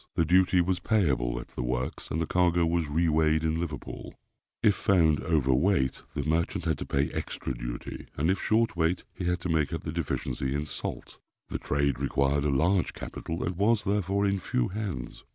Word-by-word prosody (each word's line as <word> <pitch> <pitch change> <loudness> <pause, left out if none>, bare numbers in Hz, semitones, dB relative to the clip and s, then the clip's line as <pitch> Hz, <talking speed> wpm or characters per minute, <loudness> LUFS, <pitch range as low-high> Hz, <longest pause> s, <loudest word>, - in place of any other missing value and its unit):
The 85 - +3
duty 90 +2 +4
was 90 +1 0
payable 65 - +1
at - - -9
the - - -5
works, 60 +1 -3
and 80 - -1
the 80 - +1
cargo 85 0 +2
was 85 -1 0
re 80 +4 +1
weighed 80 0 +3
in 80 0 0
Liverpool. 80 -5 -6 0.5
If 105 - +6
found 85 -7 +3
over 75 -5 +2
weight, 70 -2 +2
the 70 - -1
merchant 80 +3 0
had - - 0
to - - -5
pay 70 +1 0
extra 65 - -4
duty; - - -6
and 80 +6 +2
if 95 - -1
short 115 -1 +2
weight, 85 +1 +1
he 90 - -5
had 90 0 +1
to 90 - -3
make 80 -2 +1
up 85 - -3
the 75 - -4
deficiency 70 -4 -2
in 75 +1 -1
salt. 75 - -6 0.3
The - - -3
trade 70 -2 0
required 70 +1 +1
a - - +2
large 85 +7 +2
capital, 80 +1 -5
and 90 - -2
was, 105 +2 +3
therefore, 100 0 +1
in 100 0 +1
few 60 -8 -1
hands. 95 - -5
80 Hz, 200 wpm, -28 LUFS, 70-90 Hz, 0.5 s, If